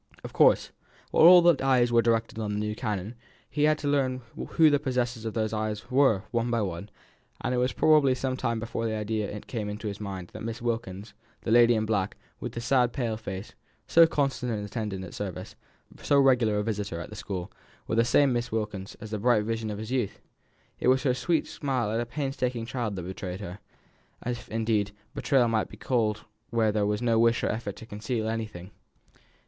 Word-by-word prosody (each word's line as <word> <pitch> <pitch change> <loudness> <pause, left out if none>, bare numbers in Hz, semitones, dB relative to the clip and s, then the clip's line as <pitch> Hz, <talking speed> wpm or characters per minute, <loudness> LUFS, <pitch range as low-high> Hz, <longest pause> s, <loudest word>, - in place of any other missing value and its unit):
Of - - -8
course, - - +4 0.4
while 165 - +7
all 175 -2 +8
eyes 125 -3 +3
were 120 0 +5
directed 115 -1 0
on 105 -2 -2
the 105 - -1
new 105 0 -2
canon, 105 0 -3 0.3
he 150 0 +1
had 155 0 +3
to 150 - -4
learn 130 -3 +1
who 160 -2 +3
the 145 - +3
possessors 125 -4 -2
of 110 - -4
those 110 -1 -1
eyes 110 +2 -3
were 125 -7 +4
one 120 0 0
by 115 -2 +1
one; 90 +1 -5 0.5
and 125 - -1
it 125 - +1
was 125 +1 +1
probably 150 -4 +4
some 130 0 -2
time 115 -3 -1
before 115 0 -3
the 110 - -2
idea 105 -1 -2
came 110 -4 -4
into 105 +1 -5
his 100 -1 -5
mind 95 -3 -6
that - - -8
Miss 115 +1 -4
Wilkins, 110 -4 -4 0.3
the 110 - -2
lady 120 0 +6
in 110 0 0
black, 105 -3 -1 0.2
with - - -5
the 115 - -4
sad 125 -1 +2
pale 120 -5 -1
face, 100 -3 -7 0.3
so 165 0 +6
constant 135 -5 -1
an 105 -2 -3
attendant 105 -3 -4
at - - -10
service, 100 -4 -6 0.5
so 145 - +3
regular 125 -6 +4
a 105 - 0
visitor 105 -5 -3
at 85 - -8
the - - -8
school, 95 -3 -5 0.3
was 110 - -2
the 115 - +5
same 135 +3 +4
Miss 120 0 -2
Wilkins 105 -3 -4
as 110 0 -9
the 105 - -2
bright 115 -1 +3
vision 110 0 -2
of 105 - -4
his 110 +3 -6
youth. 125 -6 -1 0.6
It - - 0
was 130 +1 +4
her 130 -4 +3
sweet 155 +6 0
smile 130 -7 -2
at 115 +2 0
a 120 - -4
painstaking 125 -3 -2
child 115 -3 -3
that 90 - -5
betrayed 95 0 -6
her 95 0 -7 0.7
if, 120 0 -4
indeed, 110 -2 0 0.2
betrayal 135 -4 +2
it - - 0
might 110 -1 0
be - - -12
called 110 -4 0 0.3
where 115 -2 +2
there 105 -1 +1
was 105 +3 -1
no 115 -2 +3
wish 115 0 +3
or - - +1
effort 105 -2 -4
to 110 - -11
conceal 110 +1 -3
anything. 110 -5 -5
115 Hz, 210 wpm, -27 LUFS, 105-125 Hz, 0.7 s, all